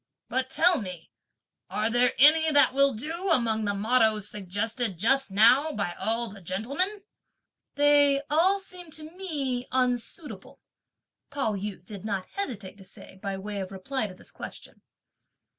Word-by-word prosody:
But 260 0 -1
tell 355 +1 +3
me, 180 -4 -8 0.6
are 215 +2 -1
there 245 +1 +3
any 315 +3 +6
that 290 -3 +5
will 275 -2 +4
do 330 - -4
among 225 -8 +2
the 205 0 0
mottoes 220 -1 +2
suggested 210 +1 -2
just 270 +7 +2
now 250 +10 +4
by 200 -7 -2
all 230 +4 -2
the 200 -2 -11
gentlemen?" 280 - -2 0.7
"They 285 -1 +4
all 335 +6 +4
seem 365 -3 -9
to 315 - -6
me 275 -10 -2
unsuitable!" 250 - -2 0.7
Pao 275 -7 -1
yü 195 -2 -5
did 200 -1 -9
not 200 -3 -3
hesitate 220 - -6
to - - -12
say 190 0 -11
by 195 -1 -3
way 200 +1 -5
of 190 0 -6
reply 215 +5 -3
to 185 - -11
this - - -15
question. - - -10
235 Hz, 150 wpm, -27 LUFS, 205-290 Hz, 0.7 s, any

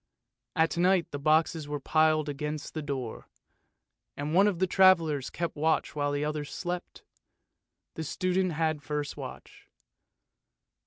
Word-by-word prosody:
At 160 +1 +2
night 180 -1 +3
the 145 - -4
boxes 155 +1 +2
were 145 0 -3
piled 155 +1 +2
against 150 +1 -4
the 155 - -3
door, 135 -6 -5 0.9
and 145 +2 -3
one 195 +4 +6
of 200 -4 0
the 190 - +2
travellers 170 -7 +4
kept 170 -2 -3
watch 160 +1 0
while 145 -1 0
the 145 +1 -1
others 150 -1 -3
slept. 175 0 -5 0.9
The 160 - -5
student 185 +3 0
had 155 0 0
the 145 - -24
first 150 -1 -3
watch. - - -10
155 Hz, 145 wpm, -29 LUFS, 145-170 Hz, 0.9 s, one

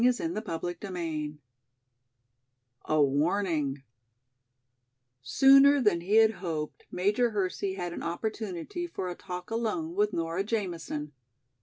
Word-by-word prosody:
CHAPTER 245 - 0 0.2
XIX 165 -6 -3 1.5
A 155 - +1
Warning 145 -1 0 1.4
SOONER 275 - +6
than 210 -9 +2
he 195 +5 0
had 220 0 +7
hoped 165 -7 -5
Major 210 +6 +1
Hersey 195 -2 -2
had 175 -2 -4
an - - -6
opportunity 210 - -4
for 190 - -4
a - - -3
talk 180 +2 -7
alone 235 +9 -2
with 415 +2 +2
Nora 165 +3 -1
Jamison. 175 -8 -3
190 Hz, 110 wpm, -29 LUFS, 165-225 Hz, 1.5 s, had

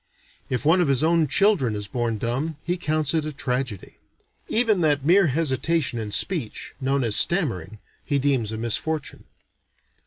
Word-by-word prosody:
If 130 +2 -2
one 170 +4 +4
of 175 - +1
his 135 0 +2
own 165 -1 +3
children 160 - +2
is 105 -1 -4
born 115 +1 -2
dumb, 135 +8 -2
he 175 +2 0
counts 155 -4 -1
it 160 -2 +1
a 155 - -4
tragedy. 125 -6 -4 0.5
Even 220 -5 +3
that 145 -3 +1
mere 180 +3 +5
hesitation 150 -2 0
in 110 -2 -5
speech, 150 - -3
known 135 0 0
as 110 -3 +1
stammering, 110 - +1 0.3
he 145 - -1
deems 130 -6 0
a 110 - -4
misfortune. 135 +7 -3
140 Hz, 160 wpm, -23 LUFS, 120-165 Hz, 0.5 s, mere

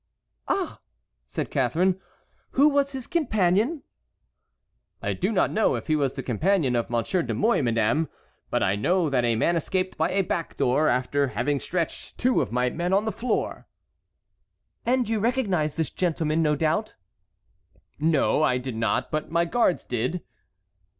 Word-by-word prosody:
"Ah!" 385 -2 -1 0.5
said - - -4
Catharine, 185 +3 +1 0.5
"who 285 +3 +5
was 280 -1 +1
his 260 -2 -5
companion?" 235 - +1 1.2
"I - - -2
do 190 +4 -1
not 210 - +2
know 220 - +2
if - - -5
he 155 - +1
was 140 -3 0
the 135 - -4
companion 140 - +1
of 120 - -1
Monsieur 120 +10 0
de - - -3
Mouy, 225 -4 +2
madame, 120 +6 +1 0.4
but - - +1
I 95 - +2
know 170 - +1
that 125 -2 +2
a 120 -1 +2
man 170 +10 +2
escaped 185 +3 -1
by - - +2
a 195 +1 +1
back 170 -2 -3
door 145 +5 +2
after 140 +3 +1
having 130 +5 -1
stretched 170 +1 -4
two 255 +1 +2
of 120 -7 -3
my 125 +1 +1
men 175 +5 -1
on 200 +2 +3
the 220 - 0
floor." 235 0 -2 1.2
"And 250 -1 +2
you 220 -1 0
recognized 200 - 0
this 160 -2 -1
gentleman, 160 -3 0
no 150 -2 +2
doubt?" 160 +8 0 1.0
"No, 155 -1 +2
I 130 -5 +3
did 125 -2 -5
not, 110 -2 0
but 155 0 -2
my 170 +1 +2
guards 185 0 +1
did." 125 +9 -2
165 Hz, 165 wpm, -25 LUFS, 135-205 Hz, 1.2 s, who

